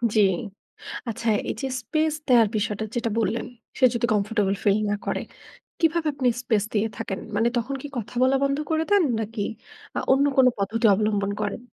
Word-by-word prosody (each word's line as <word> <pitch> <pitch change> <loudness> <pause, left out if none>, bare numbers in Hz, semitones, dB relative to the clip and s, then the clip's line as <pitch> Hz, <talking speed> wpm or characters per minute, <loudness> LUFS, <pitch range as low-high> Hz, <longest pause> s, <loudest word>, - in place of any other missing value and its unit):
জি। 215 - +6 0.9
আচ্ছা 230 +1 -4 0.2
এই - - 0
যে 270 - -1
স্পেস 310 +6 0
দেয়ার 240 -4 +6
বিষয়টা 210 0 -1
যেটা 235 -1 0
বললেন, 230 +1 -1 0.3
সে - - -3
যদি 240 0 +1
কমফোর্টেবল 205 -1 +1
ফিল 205 +1 +3
না - - +1
করে, - - -1 0.6
কিভাবে 330 -1 +2
আপনি 275 -2 0
স্পেস 220 -5 +1
দিয়ে 215 0 +2
থাকেন? 195 - -4 0.2
মানে 225 +3 +3
তখন 245 +4 -2
কি 290 - -6
কথা 230 +1 -5
বলা 260 +1 +4
বন্ধ 275 0 +1
করে 320 0 +1
দেন? 405 -3 +5 0.2
নাকি 220 0 -4 0.6
আ - - +2
অন্য 270 +2 +4
কোন 260 -1 +7
পদ্ধতি 220 +4 -1
অবলম্বন 205 -1 0
করেন? 205 +2 -3
230 Hz, 180 wpm, -24 LUFS, 210-270 Hz, 0.9 s, কোন